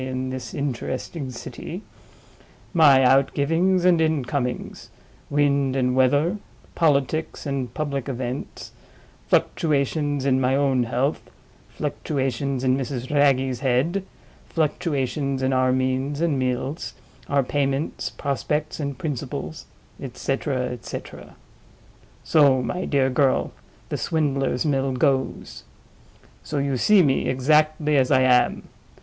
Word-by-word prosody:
in 130 0 -3
this 130 -2 -6
interesting 135 +1 -4
city); 130 - -8 0.9
my 145 -6 +6
outgivings 165 +8 +2
and 175 -3 +5
incomings; 140 -5 -2 0.4
wind 140 -2 +2
and 125 -1 +1
weather; 145 +9 +3 0.4
politics 155 0 0
and 135 -4 -3
public 140 -3 -3
events; 130 +1 -5 0.6
fluctuations 145 -2 +1
in 130 -1 +2
my 130 +1 +2
own 135 -2 +2
health; 125 +5 -1 0.5
fluctuations 135 -1 -2
in 130 0 +3
Mrs. 130 -1 -4
Wragge's 135 -3 +2
head; 140 +9 +1 0.5
fluctuations 140 -4 -1
in 130 0 +1
our 130 0 +3
means 130 +2 -1
and 160 -5 +1
meals, 130 +4 -2 0.3
our 140 -1 +2
payments, 140 +2 -1
prospects, 150 +2 -2
and 140 -3 -3
principles; 145 +2 -5 0.4
et 130 -3 -7
cetera, 135 -1 -1
et 120 -2 -8
cetera. - - -8 0.9
So, 140 -5 +4
my 180 +9 -3
dear 135 -2 +1
girl, 135 +1 +2 0.4
the - - -2
Swindler's 140 -5 0
Mill 135 -2 +1
goes. 130 0 -1 0.8
So 150 - -5
you 140 -1 0
see 200 - +5
me 135 -3 +1
exactly 150 +3 +2
as 130 -1 +3
I 130 -2 +4
am. 125 -1 +3
140 Hz, 115 wpm, -23 LUFS, 130-150 Hz, 0.9 s, my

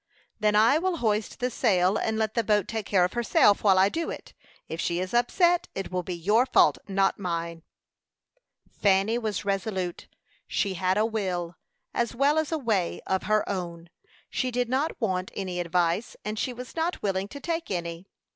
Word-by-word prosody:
"Then 210 -1 +2
I 230 +8 +5
will 365 0 -1
hoist 215 -3 -1
the 250 0 -1
sail, 190 -5 +2
and 220 0 -1
let 220 -1 0
the 230 - +1
boat 210 -2 +2
take 220 -3 -4
care 185 -3 +4
of 180 - -4
herself 230 -3 +3
while 195 -3 +5
I 190 +1 +6
do 330 +11 -2
it. - - -8 0.3
If 160 - -4
she 170 0 -1
is 185 +3 -4
upset, 345 +9 +3
it 195 -1 -4
will 180 0 -1
be 180 0 -5
your 210 +9 +2
fault, - - +4
not 195 0 +1
mine." 170 -3 -3 1.1
Fanny 200 +3 +2
was 215 -3 -3
resolute; 195 -3 -2 0.4
she 195 - 0
had 185 +1 0
a 215 - +3
will, 185 -6 -2 0.4
as 235 0 -1
well 285 +5 +3
as 315 0 -2
a 320 - +1
way, 215 - 0
of 190 0 -1
her 215 0 +2
own. 170 -3 -5 0.4
She 255 - -1
did 245 -1 -1
not 275 +5 -1
want 185 -5 -1
any 185 -2 -3
advice, 175 +4 0
and 210 0 -3
she 255 - -1
was 250 +1 -9
not 335 +2 -2
willing 195 -1 0
to 285 - -9
take 330 +1 -3
any. 170 0 -4
205 Hz, 190 wpm, -27 LUFS, 185-235 Hz, 1.1 s, I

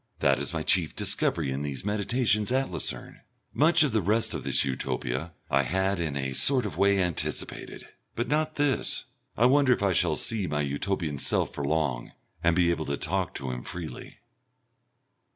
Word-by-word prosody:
That 70 -1 +2
is 70 - -2
my 80 -2 -3
chief 85 -3 +1
discovery 70 - 0
in 65 +1 -3
these 70 +4 -4
meditations 105 +1 +1
at 135 +1 0
Lucerne. - - -4 0.3
Much 165 +2 +4
of 145 - +1
the 110 -1 +1
rest 110 +5 +1
of - - -4
this - - +2
Utopia 65 +3 -3 0.2
I 70 - +4
had 95 +7 0
in 80 -4 -2
a 65 -1 -3
sort 130 - +4
of 105 - -4
way 100 0 +3
anticipated, 90 -3 -3 0.3
but 120 +1 -2
not 155 +2 0
this. 145 -4 0 0.3
I 115 - +4
wonder 135 0 +5
if 100 - -3
I 100 -2 +2
shall 85 -2 +2
see 105 +3 -1
my 75 -1 -1
Utopian 75 +1 -2
self - - +1
for 70 - -4
long 70 -5 -1 0.3
and 85 0 +3
be 85 -1 +3
able 80 -2 -2
to 70 0 -2
talk 90 +1 -2
to 65 -2 -4
him 60 0 -5
freely.... 85 -3 -8
90 Hz, 185 wpm, -27 LUFS, 70-110 Hz, 0.3 s, wonder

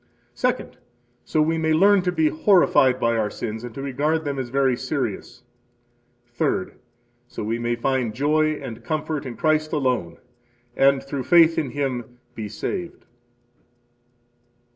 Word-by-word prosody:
Second, - - -2 0.4
so 155 - +1
we 165 +1 0
may 160 0 +1
learn 200 +4 +5
to 180 0 0
be 160 -3 +2
horrified 155 -8 +4
by 115 -1 +1
our 110 -2 0
sins, 110 +1 -5
and 120 -2 -8
to 135 - -6
regard 150 +4 -1
them 140 -1 -2
as 130 -2 -4
very 135 0 +2
serious. 120 -3 -4 0.8
Third, 150 +9 -2 0.5
so 120 - -7
we 115 +2 -2
may 120 0 -1
find 120 -2 -1
joy 155 +3 +2
and 120 -6 -8
comfort 150 +1 -3
in 120 - -7
Christ 155 -1 +1
alone, 125 - -1 0.6
and 135 0 +3
through 135 -2 -5
faith 165 0 +6
in 150 -5 -1
Him 125 -2 -4 0.2
be 110 -2 -6
saved. 175 - -5
135 Hz, 145 wpm, -23 LUFS, 120-155 Hz, 0.8 s, faith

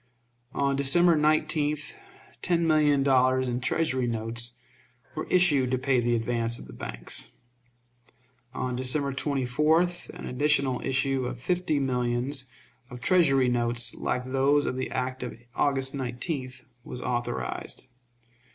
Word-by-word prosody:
On 140 0 +1
December 165 +5 +4
19th 150 -1 +1 0.5
ten 170 -2 +1
million 150 -3 +3
dollars 130 -1 +3
in 125 0 -2
Treasury 130 -4 0
notes 115 +1 -2 0.6
were - - -5
issued 150 -8 +3
to 130 - +1
pay 130 0 +1
the 120 0 +1
advance 115 0 0
of - - -10
the - - -12
banks. - - -5 1.2
On 125 -1 -3
December 135 +3 0
24th 150 +6 +1
an - - -9
additional 135 -1 +1
issue 135 -1 0
of 125 -1 -6
fifty 175 +1 0
millions 125 +1 -1 0.4
of 125 -1 -9
Treasury 135 -6 +3
notes 120 -1 +2
like 125 0 -2
those 135 +3 +2
of - - -2
the 130 - -3
act 130 0 -3
of 120 -2 -6
August 135 -1 0
19th 130 0 -4 0.2
was 125 - -7
authorized. 120 - -3
130 Hz, 130 wpm, -27 LUFS, 125-145 Hz, 1.2 s, December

